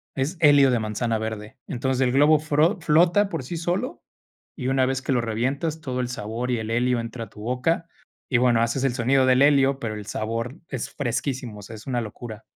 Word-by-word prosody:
Es 140 +6 -1
helio 145 -3 +6
de 125 -2 +2
manzana 110 +1 -1
verde, 110 -1 -6
entonces, 130 +1 -1
el 125 -1 +3
globo 145 +3 +5
fro 155 +6 +2
flota 175 +6 +4
por 135 - -4
sí 170 +7 -6
solo, 175 +9 -2 0.6
y 130 -5 -3
una 135 -1 +3
vez 135 0 -1
que - - -2
lo 125 - +2
revientas, 135 +8 -2
todo 130 -2 -3
el 125 - -2
sabor 120 +1 -4
y 120 - +1
el 110 0 -4
helio 120 +1 +1
entra 115 0 -5
a - - -18
tu 105 - -13
boca. 125 +9 -1 0.4
Y 125 - +3
bueno, 120 -2 +3
haces 115 +3 0
el 130 - +1
sonido 130 +2 +3
del 130 0 +4
helio, 140 -1 +4
pero 115 -4 -3
el 105 -1 -7
sabor 115 +6 -3
es 130 -5 -4
fresquísimo, 125 -3 -3
o - - -9
sea, 110 +4 -9
es 110 - -12
una 125 -2 0
locura. 110 0 -8
125 Hz, 220 wpm, -24 LUFS, 115-140 Hz, 0.6 s, helio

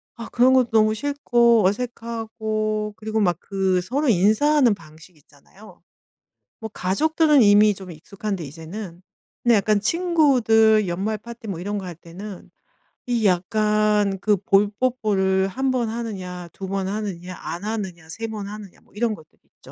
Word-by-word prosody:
아 230 -1 -8
그런 255 +2 +4
것도 255 -2 +3
너무 215 -1 +4
싫고 235 -4 +2
어색하고 220 -1 -2
그리고 220 0 -2
막 175 -5 +2
그 190 -2 0
서로 270 +8 -1
인사하는 230 +6 +4
방식이 160 0 -17
있잖아요. 145 +9 -19 0.8
뭐 220 0 -6
가족들은 300 - +2
이미 205 0 +6
좀 190 -2 -10
익숙한데 190 +3 -6
이제는 170 +5 -9 0.4
근데 240 -2 +5
약간 205 +1 +2
친구들 225 - +3
연말 200 +5 -2
파티 235 +1 -11
뭐 180 -4 -4
이런 205 +3 -3
거 190 - -5
할 175 -2 -7
때는 180 +4 -10 0.6
이 235 -3 0
약간 210 +1 +1
그 210 +1 +2
볼 195 +2 +2
뽀뽀를 195 -7 +1
1 265 +6 -1
번 245 -3 0
하느냐 185 -6 -6
2 195 - -7
번 195 0 -2
하느냐 190 -3 -5
안 175 +4 -6
하느냐 190 -7 -5
3 225 +7 -5
번 210 -3 -6
하느냐 205 -2 -10
뭐 - - -28
이런 220 -1 0
것들이 155 -3 -19
있죠. - - -42
210 Hz, 290 characters per minute, -22 LUFS, 190-230 Hz, 0.8 s, 이미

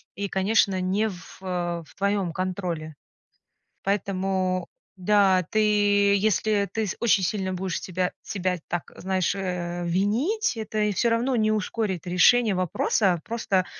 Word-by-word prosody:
и, 200 0 -3
конечно, 195 0 +2
не 195 +4 0
в, 180 -4 -11
э, 175 -2 -3
в - - -20
твоем 200 -3 0
контроле. 175 -4 -4 0.9
Поэтому, 190 -2 -1 0.3
да, 190 -1 +3
ты 205 -1 +3
если 210 0 +1
ты 225 -1 -1
с 195 - -3
очень 215 -4 +3
сильно 190 0 -1
будешь 185 0 -3
себя 180 0 -2
себя 185 -2 -2
так, 175 -1 -4
знаешь, 190 -1 0
э, 175 -2 -3
винить, 235 - +1
это 220 -1 -5
и 210 -1 +1
всё 235 +5 +2
равно 240 +3 +1
не 215 -2 +2
ускорит 210 -3 -2
решение 210 +5 +4
вопроса. 185 +1 +1
Просто 205 -5 0
195 Hz, 140 wpm, -25 LUFS, 185-210 Hz, 0.9 s, решение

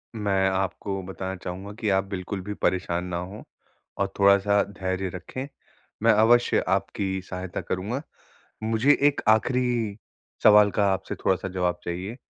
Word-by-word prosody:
मैं 100 -3 +1
आपको 95 +1 -2
बताना 95 0 -5
चाहूँगा 95 +2 -7
कि 110 - 0
आप 95 - +2
बिल्कुल 95 0 -4
भी 105 +3 -5
परेशान 90 -3 -1
ना 90 -1 -3
हों 95 +4 -7 0.6
और - - +2
थोड़ा-सा 100 +1 +5
धैर्य 95 -1 -3
रखें। 130 +8 -6 0.6
मैं - - +6
अवश्य 120 +3 +4
आपकी 95 0 -1
सहायता 90 -1 -5
करूँगा। 105 +9 -3 0.6
मुझे 115 +6 +3
एक 145 - -2
आख़िरी 115 -1 +2 0.5
सवाल 105 -1 +7
का 100 0 +1
आपसे 95 0 -3
थोड़ा-सा 95 0 +1
जवाब 90 -1 -1
चाहिए 90 +6 -4
95 Hz, 140 wpm, -25 LUFS, 95-105 Hz, 0.6 s, सवाल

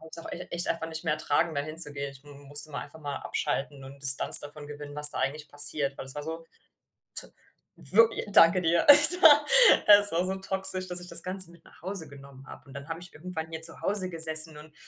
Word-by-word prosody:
habe 160 - -20
ich's - - -11
auch 165 - -14
ech 180 - -13
echt 175 0 -6
einfach 165 -1 -8
nicht 160 0 -10
mehr 155 -2 -5
ertragen, 160 +2 -6
da - - -5
hinzugehen. 145 -3 -2
Ich 135 - -17
m 145 - -21
m 140 - -21
musste 145 +1 +2
mal 145 - -11
einfach 160 - -18
mal 145 -2 -11
abschalten 140 0 -9
und 135 +1 -19
Distanz 135 -1 +7
davon 145 0 -15
gewinnen, 145 0 -15
was 150 0 +6
da - - -9
eigentlich 150 +3 -8
passiert, 145 -1 +1
weil - - -13
es 130 - 0
war 150 - -11
so 160 +1 -11
t - - -40 1.3
wirk 225 +10 -1 0.2
Danke 170 +1 0
dir. 170 0 -4
Es 295 +5 +6
war 295 -2 +2 0.4
es 205 0 +4
war 170 +2 -6
so 190 +1 -8
toxisch, 190 -1 +1
dass 180 0 -2
ich 175 - -13
das 170 -1 -1
Ganze 185 -1 +2
mit 170 -1 -25
nach - - -26
Hause 185 -2 -4
genommen 140 -1 -20
habe. - - -18
Und 135 - -20
dann 140 +3 -15
habe 165 0 -11
ich 180 - -10
irgendwann 160 0 -12
hier 160 0 -13
zu - - +1
Hause 195 -2 0
gesessen 160 -2 +3
und 150 0 -20
160 Hz, 240 wpm, -21 LUFS, 145-180 Hz, 1.3 s, Distanz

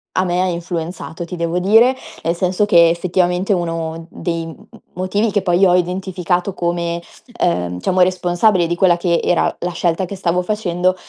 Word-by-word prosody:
a 185 - +2
me 180 0 0
ha - - +1
influenzato 170 -1 -4
ti 175 - -7
devo 170 0 -2
dire, 225 +8 +4 0.3
nel 165 +1 0
senso 185 +3 +1
che 170 -5 +6
effettivamente 180 +2 0
uno 165 -2 -3
dei 165 -2 -3
m - - -7 0.2
m - - -16 0.2
motivi 200 +4 0
che 205 - +1
poi 185 0 +3
ho 180 - +4
identificato 180 +1 -1
come, 170 -1 -2 0.4
ehm, 90 +1 0
diciamo 185 - 0
responsabile 180 +1 +2
di 170 - -1
quella 180 -1 +4
che 170 -1 +1
era 175 - +2 0.2
la 180 - -3
scelta 170 +1 0
che 200 - -7
stavo 180 -1 0
facendo, 185 -3 0
175 Hz, 180 wpm, -18 LUFS, 170-185 Hz, 0.4 s, che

